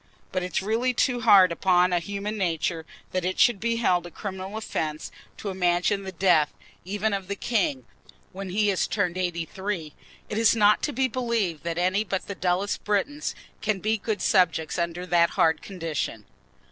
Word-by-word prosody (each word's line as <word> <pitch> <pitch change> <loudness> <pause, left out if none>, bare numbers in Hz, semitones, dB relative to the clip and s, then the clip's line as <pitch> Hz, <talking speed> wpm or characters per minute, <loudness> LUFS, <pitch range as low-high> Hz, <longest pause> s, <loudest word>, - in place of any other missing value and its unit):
But 185 - -1
it 180 0 -5
is - - +1
really 235 +5 0
too 245 0 +1
hard 195 -5 +7
upon 180 +1 +3
human 200 +4 -2
nature 165 -3 -1 0.2
that 185 -1 -1
it 185 +1 -2
should 240 -5 +5
be 230 +2 0
held 180 -7 +1
a - - -9
criminal 190 +3 -6
offence 155 -8 -3 0.3
to 205 - -5
imagine 180 +2 +1
the 190 -1 -6
death 175 -4 +3 0.3
even 205 +3 -1
of 195 -2 -3
the 200 - -3
king 185 - -1 0.5
when 195 0 -6
he 205 +2 +2
is 190 - 0
turned 180 -5 -1
eighty 175 -2 -2
three. 185 -4 -4 0.3
It 215 - -2
is 225 0 +5
not 210 -1 +4
to 295 - -1
be 265 0 +1
believed 230 -10 -1
that 170 -1 -2
any 185 +4 +2
but 190 -2 -3
the 200 - -4
dullest 185 +2 -1
Britons 250 +9 -1 0.3
can 215 -2 0
be 215 +3 0
good 205 -1 -2
subjects 165 -2 +2
under 170 +1 -2
that 170 -1 +3
hard 160 -1 +3
condition. 165 - -4
190 Hz, 185 wpm, -26 LUFS, 175-210 Hz, 0.5 s, hard